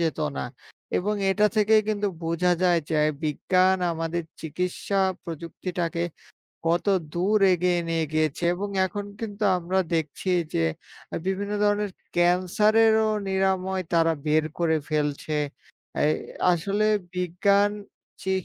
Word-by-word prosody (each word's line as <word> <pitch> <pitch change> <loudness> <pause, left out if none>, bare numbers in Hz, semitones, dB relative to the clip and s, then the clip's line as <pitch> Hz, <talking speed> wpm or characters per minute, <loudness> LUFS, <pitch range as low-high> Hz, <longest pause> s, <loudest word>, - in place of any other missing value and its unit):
যেত 160 -2 0 0.2
না, - - -2 0.5
এবং 210 +3 0 0.2
এটা 210 +2 +3
থেকেই 215 +1 +5
কিন্তু 205 -1 0 0.2
বোঝা 170 +2 +2
যায় 175 -2 +4
যে 155 - +1 0.3
বিজ্ঞান 185 +5 +2 0.2
আমাদের 165 +1 -2 0.2
চিকিৎসা 180 +5 -2 0.2
প্রযুক্তিটাকে 170 +1 -4 0.6
কত 170 +4 +1 0.3
দূর 200 +5 +2
এগিয়ে 180 0 +2
নিয়ে 165 -1 +1
গিয়েছে 155 +1 0
এবং 200 +3 -4 0.2
এখন 205 +2 -5 0.2
কিন্তু 210 -1 -4
আমরা 180 +2 -1 0.2
দেখছি 160 +4 -2 0.2
যে 80 - +2 0.6
বিভিন্ন 200 +2 -1
ধরনের 205 -1 +1 0.2
'ক্যান্সারেরও' 215 +5 +3
নিরাময় 190 0 0
তারা 165 -1 +4
বের 155 +1 +3
করে 160 -2 +2
ফেলছে। 150 0 -1 0.7
এই 155 - +3 0.4
আসলে 200 +5 0 0.3
বিজ্ঞান 200 +3 +2 0.5
চিক 190 -1 -1
180 Hz, 115 wpm, -25 LUFS, 165-200 Hz, 0.7 s, থেকেই